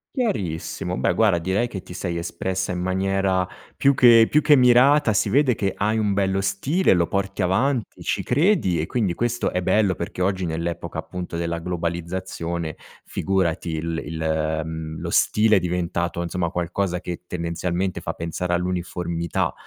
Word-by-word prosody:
Chiarissimo. 105 Hz, -, -2 dB
Beh, 65 Hz, -, +1 dB
guarda, 95 Hz, -2 st, +3 dB
direi 95 Hz, +8 st, 0 dB
che 95 Hz, -6 st, -6 dB
ti 90 Hz, -, -13 dB
sei 90 Hz, -1 st, -3 dB
espressa 95 Hz, +2 st, -3 dB
in 90 Hz, -, -3 dB
maniera 95 Hz, 0 st, +1 dB, 0.3 s
più 140 Hz, 0 st, +4 dB
che 115 Hz, -3 st, +7 dB
più 150 Hz, -, +4 dB
che 150 Hz, -1 st, +5 dB
mirata. 125 Hz, +1 st, +5 dB
Si 105 Hz, -, +1 dB
vede 130 Hz, +2 st, +3 dB
che 100 Hz, -2 st, -1 dB
hai 105 Hz, +2 st, 0 dB
un 105 Hz, -2 st, +1 dB
bello 95 Hz, -1 st, +1 dB
stile, 100 Hz, -, +2 dB
lo 85 Hz, -2 st, +2 dB
porti 100 Hz, 0 st, -2 dB
avanti, 115 Hz, +7 st, 0 dB
ci -, -, -1 dB
credi. 140 Hz, -, +2 dB
E -, -, 0 dB
quindi 110 Hz, -8 st, 0 dB
questo 120 Hz, +5 st, -1 dB
è 90 Hz, -, -1 dB
bello. 100 Hz, +1 st, +2 dB
Perché 85 Hz, +1 st, -5 dB
oggi, 95 Hz, -1 st, 0 dB
nell'epoca, 85 Hz, +1 st, -3 dB
appunto, 90 Hz, -2 st, -6 dB
della 85 Hz, 0 st, -2 dB
globalizzazione, 85 Hz, -1 st, -4 dB, 0.3 s
figurati, 90 Hz, -3 st, -1 dB
il 80 Hz, +1 st, -3 dB
il 80 Hz, 0 st, -1 dB
mhmm, 80 Hz, 0 st, -6 dB
lo -, -, -4 dB
stile 105 Hz, -1 st, +4 dB
è -, -, +3 dB
diventato, 85 Hz, -1 st, -2 dB
insomma, 85 Hz, 0 st, -2 dB
qualcosa 90 Hz, +1 st, -2 dB
che 90 Hz, 0 st, -6 dB
tendenzialmente 90 Hz, +2 st, -2 dB
fa -, -, -4 dB
pensare 85 Hz, +2 st, -3 dB
all'uniformità. 85 Hz, -1 st, -2 dB
90 Hz, 160 wpm, -23 LUFS, 85-105 Hz, 0.3 s, che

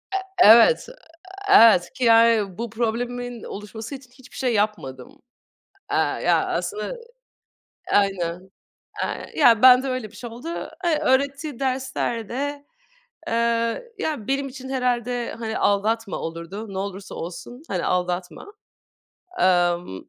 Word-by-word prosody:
Eee, 385 Hz, -, 0 dB, 0.2 s
evet. 235 Hz, -, +7 dB, 0.6 s
Eee, 400 Hz, -, +7 dB
evet, 220 Hz, -6 st, +6 dB
ki 260 Hz, -, -5 dB
yani 225 Hz, -4 st, +4 dB
bu 235 Hz, +1 st, -4 dB
problemimin 240 Hz, +1 st, -3 dB
oluşması 215 Hz, +5 st, -8 dB
için 260 Hz, -2 st, -14 dB
hiçbir 255 Hz, 0 st, -16 dB
şey 250 Hz, -3 st, 0 dB
yapmadım. 205 Hz, -, -3 dB, 0.7 s
Aaa, -, -, 0 dB
ya -, -, +2 dB
aslında, 430 Hz, +4 st, -3 dB, 1.0 s
aynen. 185 Hz, -2 st, 0 dB, 0.5 s
Ay, -, -, -4 dB
ya 230 Hz, -1 st, +5 dB
bende 255 Hz, +1 st, +7 dB
öyle 255 Hz, -5 st, -4 dB
bir 210 Hz, -, -16 dB
şey 240 Hz, +1 st, -8 dB
oldu. 245 Hz, +8 st, -9 dB, 0.4 s
E, 325 Hz, -3 st, +2 dB
öğrettiği 280 Hz, -1 st, 0 dB
derslerde, 265 Hz, +1 st, -3 dB, 0.6 s
eee, -, -, -2 dB, 0.7 s
ya 290 Hz, -10 st, -3 dB
benim 275 Hz, +1 st, -1 dB
için 265 Hz, 0 st, -9 dB
herhâlde 245 Hz, -2 st, -1 dB
hani 220 Hz, -1 st, -3 dB
aldatma 210 Hz, +1 st, 0 dB
olurdu. 170 Hz, +6 st, -7 dB
Ne 190 Hz, -, -5 dB
olursa 195 Hz, 0 st, -6 dB
olsun 240 Hz, -, -8 dB
hani 180 Hz, -3 st, -2 dB
aldatma. 180 Hz, -, -3 dB, 0.9 s
Aaa, 175 Hz, -1 st, +3 dB
ımm, 170 Hz, -, -9 dB
230 Hz, 125 wpm, -23 LUFS, 195-260 Hz, 1.0 s, evet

